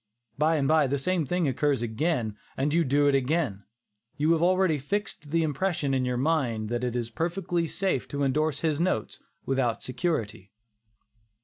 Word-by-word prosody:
By 155 +3 +2
and 140 -3 +1
by, 155 -2 +4
the 140 +2 0
same 170 +1 0
thing 180 0 +1
occurs 140 -1 +1
again, 120 -2 -1 0.2
and 145 +3 0
you 170 +1 +4
do 145 +1 +2
it 140 - +4
again; 135 - 0 0.5
you 155 +3 +2
have 165 -1 +3
already 185 -3 +3
fixed 195 0 -3
the 165 +2 +2
impression 155 -1 -1
in 130 -1 +1
your 125 0 -1
mind 125 -7 0
that 120 +1 -2
it 125 -1 -1
is 120 -1 -2
perfectly 170 - -1
safe 185 -6 -1
to 145 0 -2
indorse 145 +2 0
his 155 -3 0
notes 140 - -1 0.2
without 130 -4 0
security. 115 - -3
145 Hz, 175 wpm, -27 LUFS, 125-165 Hz, 0.5 s, by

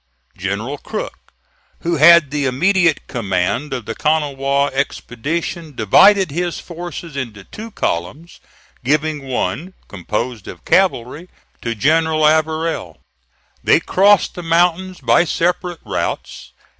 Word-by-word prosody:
General 105 +9 -4
Crook, - - -7 0.5
who 170 0 -1
had 160 -1 +7
the 145 -2 0
immediate 175 +4 +2
command 100 +4 -2
of 125 -4 -4
the 115 - -4
Kanawha 140 -1 0
expedition, 145 +4 -3
divided 185 - +5
his 175 +3 -2
forces 170 -2 -8
into 115 -7 -5
two 220 - -9
columns, 145 - -4 0.4
giving 150 +3 0
one, 160 +7 -3
composed 105 +3 -4
of 85 - -10
cavalry, 170 -2 +1 0.3
to 115 -1 -3
General 155 +5 +2
Averell. 155 - 0 0.7
They - - +5
crossed 200 +1 +3
the 175 - -7
mountains 175 +2 +1
by - - +3
separate 175 0 -1
routes. - - -4
150 Hz, 115 wpm, -18 LUFS, 125-170 Hz, 0.7 s, had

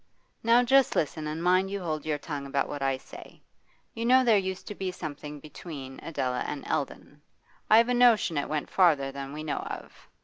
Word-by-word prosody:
Now 235 +2 +5
just 270 +1 +4
listen, 155 0 -1
and 155 +2 -4
mind 185 +2 +3
you 200 0 -3
hold 155 -4 -4
your 150 -1 0
tongue 145 -1 -6
about 140 0 0
what 145 - -6
I 135 -1 +1
say. 130 - -13 0.5
You 230 - -4
know 255 +2 +5
there 230 -3 +5
used 190 -2 -1
to - - -4
be 190 -2 -3
something 150 -3 -7
between 140 -2 -9
Adela 130 -6 -2
and 145 - -5
Eldon. 145 +1 -4 0.5
I've 230 +2 +7
a - - +2
notion 240 -8 +4
it 145 - -1
went 150 -1 -3
farther 150 -7 +3
than 135 0 -6
we 150 +1 -6
know 155 - -2
of. - - -8
155 Hz, 200 wpm, -28 LUFS, 145-200 Hz, 0.5 s, I've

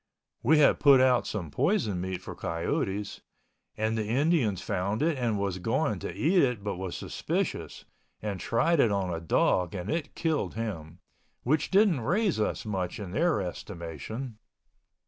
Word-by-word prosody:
We 155 +6 +4
had 150 - +5
put 140 -3 +7
out 130 -1 +3
some 90 -8 -4
poisoned 110 - +1
meat 95 0 -4
for - - -7
coyotes 95 - -2 0.6
and 110 +1 0
the 110 -2 -2
Indians 130 - +2
found 100 +6 -1
it 165 -1 +2
and 120 -5 0
was 100 -2 -2
going 115 - 0
to - - -5
eat 160 - +3
it 125 -6 0
but 100 -3 -3
was 95 -1 -4
suspicious - - -3 0.3
and 105 -3 -4
tried 155 - +1
it 115 - +4
on 95 -3 -1
a 85 - -4
dog 90 +2 +1
and 90 +1 -4
it 155 -2 -3
killed 160 -2 -1
him, 90 -8 -5 0.5
which 150 +5 +1
didn't 195 - +4
raise 185 - +1
us 105 - -1
much 95 -4 -3
in 100 -4 -6
their 160 - +2
estimation. 95 - -6
110 Hz, 165 wpm, -28 LUFS, 95-145 Hz, 0.6 s, put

